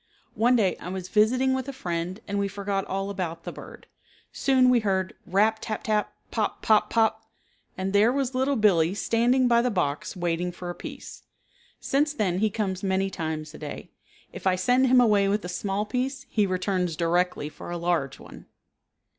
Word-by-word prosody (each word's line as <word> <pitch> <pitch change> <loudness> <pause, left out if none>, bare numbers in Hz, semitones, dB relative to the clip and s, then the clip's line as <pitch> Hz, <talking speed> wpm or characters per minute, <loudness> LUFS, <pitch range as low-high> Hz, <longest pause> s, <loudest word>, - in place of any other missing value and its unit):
One 240 +4 +3
day 200 -6 +2
I 180 - -8
was 185 -1 -5
visiting 250 +6 +3
with 260 0 -2
a - - -3
friend 175 -2 -4
and 200 0 -1
we 200 - +1
forgot 200 0 -3
all 195 +1 -3
about 170 -4 -4
the - - -5
bird. - - -11 0.5
Soon 255 -2 +3
we 245 - +5
heard 190 -3 -1
rap, 215 +4 +2
tap, 215 -2 -4
tap, 210 -1 0 0.2
pop, - - -2
pop, 210 -1 +4
pop, 220 -1 +1 0.5
and 190 +1 -2
there 210 +4 +5
was 270 -1 -1
Little 265 +2 +1
Billee 190 -6 +3
standing 240 +4 +2
by 235 -1 +4
the 250 - +1
box 170 -9 -2
waiting 175 0 -1
for 175 0 -6
a - - -6
piece. - - -9 0.6
Since 295 +2 +1
then 190 -8 0
he 215 +1 +2
comes 190 -3 -2
many 195 0 0
times 155 -2 -4
a - - -11
day. 150 -2 -8 0.4
If - - -4
I 185 - +4
send 250 +8 +3
him 255 0 +6
away 210 -5 +4
with 200 -1 0
a - - -5
small 195 +3 -2
piece 260 +4 -3
he 210 -3 +2
returns 185 -2 -1
directly 175 -1 0
for 155 - -10
a 175 - -3
large 170 -6 -1
one. - - -13
200 Hz, 190 wpm, -26 LUFS, 180-230 Hz, 0.6 s, him